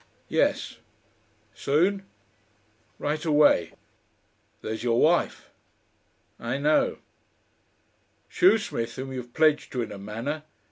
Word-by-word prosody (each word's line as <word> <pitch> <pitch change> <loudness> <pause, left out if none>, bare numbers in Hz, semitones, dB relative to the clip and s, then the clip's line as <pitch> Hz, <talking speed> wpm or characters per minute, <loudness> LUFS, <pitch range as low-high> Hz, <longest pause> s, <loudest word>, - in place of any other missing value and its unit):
"Yes." - - 0 0.8
"Soon?" 190 +7 +1 0.9
"Right 150 +1 -2
away." 150 -2 +4 0.9
"There's 110 +1 -4
your 120 -1 +2
wife." 170 +2 +1 0.9
"I 120 +3 -2
know." 150 +2 +2 1.3
"Shoesmith 215 - +2
whom 130 0 -6
you're 125 -1 -4
pledged 150 +5 +1
to 125 -2 -1
in 110 - -7
a 100 - -8
manner. 115 +10 -4
145 Hz, 95 wpm, -26 LUFS, 120-155 Hz, 1.3 s, away